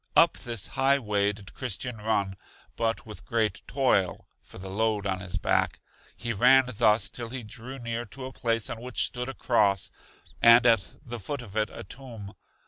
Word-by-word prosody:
Up - - +6
this 115 -5 -3
high 135 +1 +3
way 105 -5 +1
did 100 -1 -12
Christian 125 -1 -3
run, 105 -3 0 0.4
but 115 0 -1
with 105 -2 -9
great 110 -5 0
toil 125 -9 +1 0.2
for - - -13
the 95 +1 -7
load 105 +1 0
on 95 -2 -1
his 90 -1 -4
back. - - +1 0.4
He 120 -1 -2
ran 125 +5 +6
thus 105 0 +4
till 120 -2 -5
he 125 0 -5
drew 120 +5 -6
near 120 -1 -4
to 130 +5 -7
a 130 - -7
place 115 -2 0
on 115 - -6
which 125 +1 +1
stood 125 +1 -3
a 135 - -6
cross, 100 -6 +2 0.5
and 115 +1 +8
at 115 -6 +3
the 120 -1 -6
foot 125 +6 -4
of 105 -3 -12
it 110 0 +1
a - - -8
tomb. 110 -2 -7
115 Hz, 190 wpm, -27 LUFS, 100-125 Hz, 0.5 s, and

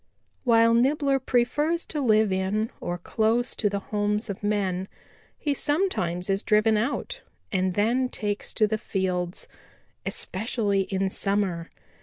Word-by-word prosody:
"While 230 -1 +5
Nibbler 275 +3 +3
prefers 290 +7 +1
to 300 - -3
live 215 -4 +4
in 195 +4 0
or 175 - -3
close 225 +6 0
to 210 - +1
the 200 - -2 0.2
homes 210 +1 0
of 195 - -8
men, 195 -3 0 0.5
he 290 - 0
sometimes 275 - -1
is 195 0 +1
driven 215 0 +3
out 275 - -2 0.3
and 185 -2 0
then 240 +5 +2
takes 205 -3 -3
to 215 - +4
the 215 +1 -1
fields, 180 -3 -2 0.6
especially 205 -1 -1
in 190 0 -1
summer. 195 -5 -1
210 Hz, 135 wpm, -26 LUFS, 195-240 Hz, 0.6 s, While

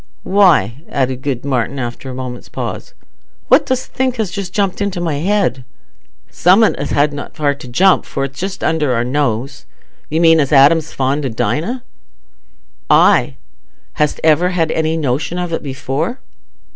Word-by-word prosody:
Why," 160 - +3
added 130 -2 -1
good 135 -2 -3
Martin, 130 0 -1
after 120 +1 -5
a 130 - -6
moment's 125 -1 -7
pause, - - -6 0.5
"what - - +5
dost 260 -1 -2
think 260 -1 0
has 220 -6 -2
just 195 -2 -5
jumped 200 0 -1
into 200 -3 -2
my 165 -4 -1
head?" 175 -6 0 0.7
"Summat 195 +5 +4
as - - -4
hadna 145 0 0
far 145 -2 +1
to 140 -2 -12
jump, 180 +10 +3
for 135 - -3
it's 135 0 -6
just 190 +1 -4
under 150 -5 +1
our 115 - 0
nose. 135 0 -2 0.4
You 160 - 0
mean 165 -1 +5
as 140 -1 0
Adam's 150 +3 +5
fond 135 +2 -1
o' 135 - -1
Dinah." 155 - -2 1.1
"Aye! 70 - +4 0.6
hast 150 -1 0
ever 160 +3 +3
had 165 -3 0
any 160 0 0
notion 150 +3 -2
of 175 -2 -3
it - - -2
before?" 140 - -3
150 Hz, 160 wpm, -16 LUFS, 135-180 Hz, 1.1 s, what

